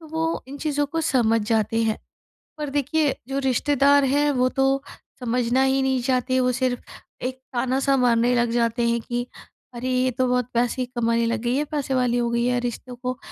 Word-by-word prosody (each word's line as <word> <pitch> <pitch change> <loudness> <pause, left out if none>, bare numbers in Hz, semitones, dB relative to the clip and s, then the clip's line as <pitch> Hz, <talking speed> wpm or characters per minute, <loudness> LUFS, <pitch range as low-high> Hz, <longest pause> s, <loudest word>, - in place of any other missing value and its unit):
तो 320 - -13
वो 325 +1 -2
इन 280 +2 -8
चीज़ों 290 -1 0
को 325 +3 -2
समझ 230 -7 +2
जाते 225 0 +1
हैं। 220 -1 0 0.6
पर 300 -1 -3
देखिए 290 +1 +1
जो 275 0 -2
रिश्तेदार 280 +1 +3
हैं, 290 +2 +2
वो 255 -1 +2
तो 270 +1 +1 0.4
समझना 245 +1 +1
ही 270 0 +2
नहीं 265 -1 +1
चाहते। 255 0 +1
वो 250 0 +2
सिर्फ 250 0 -1 0.4
एक 255 +1 -3 0.2
ताना-सा 265 +3 +1
मारने 245 -1 +3
लग 240 -1 +1
जाते 235 0 +1
हैं 235 0 +1
कि 240 +2 -3 0.5
अरे, 245 +2 -4
ये 255 0 +2
तो 255 +1 0
बहुत 250 -1 0
पैसे 245 +2 +1
कमाने 230 -1 +1
लग 230 0 -1
गई 240 +1 0
है, 295 - +1
पैसे 285 -3 -2
वाली 250 -2 +1
हो 235 -1 0
गई 235 0 +1
है। 245 0 +1
रिश्तों 245 +1 -5
को 250 +1 -4
255 Hz, 200 wpm, -23 LUFS, 240-270 Hz, 0.6 s, रिश्तेदार